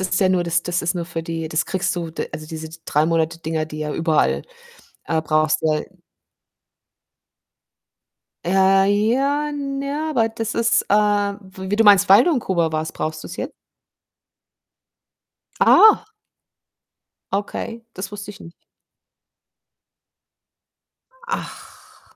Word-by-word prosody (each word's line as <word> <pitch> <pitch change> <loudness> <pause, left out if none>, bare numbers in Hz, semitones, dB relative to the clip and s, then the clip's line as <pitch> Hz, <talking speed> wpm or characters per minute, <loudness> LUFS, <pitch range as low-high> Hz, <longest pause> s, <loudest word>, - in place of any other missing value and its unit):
ist 190 +1 0
ja 190 - +4
nur 185 -1 +1
das 170 0 0
das 175 0 -1
ist 170 +2 -1
nur 175 -1 -3
für 165 -1 -6
die 165 -1 -4
das 160 +2 -1
kriegst 190 0 -1
du 170 -2 -4
d - - -4
also, 155 - -7
diese 160 0 -7 0.2
3- 150 +1 +1
Monate-Dinger, 165 -1 -1
die 155 0 -8
ja 150 -1 -3
überall, 150 - +1 0.6
äh, 160 -1 -1
brauchst, 155 0 +1
ja 155 -1 +1 2.6
Äh, 195 +1 +4 0.3
ja, 285 +4 0
n 275 -2 -4
ja. 290 +3 -3
Aber 225 -6 +2
das 225 0 -4
ist, 230 0 +2
äh - - +3
w 200 -2 -1
wie 205 - +1
du 225 - +3
meinst, 205 -3 +6
weil 195 +1 +7
du 350 - +2
in 270 - +1
Kuba 170 -7 0
warst, 155 0 -3
brauchst 155 0 -4
du's - - -8
jet - - -5 2.1
Ah. 435 0 +6 1.2
Okay, 225 +3 -4
das 185 +1 -6
wusste 205 0 -7
ich 205 - -15
nicht. 170 - -12 2.8
Ach. - - -9
185 Hz, 135 wpm, -21 LUFS, 160-210 Hz, 2.8 s, weil